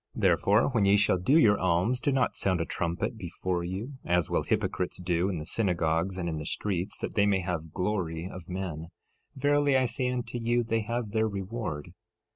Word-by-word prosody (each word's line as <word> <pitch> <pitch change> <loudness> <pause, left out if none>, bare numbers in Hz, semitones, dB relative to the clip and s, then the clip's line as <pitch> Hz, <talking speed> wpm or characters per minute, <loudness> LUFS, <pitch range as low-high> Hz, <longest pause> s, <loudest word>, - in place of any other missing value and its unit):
13:2 - - -5
Therefore, 105 +6 +4
when 115 -7 +2
ye 100 +1 +5
shall 100 -3 +3
do 135 - +4
your 105 -10 +5
alms 90 +8 +1
do 140 - +1
not 130 -2 +1
sound 95 -2 +1
a 85 - 0
trumpet 85 +9 -2
before 90 -1 -3
you, 105 +10 -5
as 90 -2 +1
will - - +2
hypocrites 90 0 -1
do 90 +1 0
in 95 - -2
the 75 - -5
synagogues 90 -2 0
and 90 -2 -2
in 80 -2 -2
the 75 - -6
streets, 95 -2 -2
that - - -4
they 100 -1 +3
may 95 -2 +2
have 85 -3 -4
glory 90 -3 -2
of 90 -2 -10
men. 90 -4 -4 0.5
Verily 145 0 +3
I 130 - +3
say 125 +1 0
unto 120 -1 -3
you, 120 +1 +1
they 115 0 0
have 115 0 -3
their 110 0 +2
reward. 100 -6 -4
95 Hz, 205 wpm, -28 LUFS, 85-115 Hz, 0.5 s, ye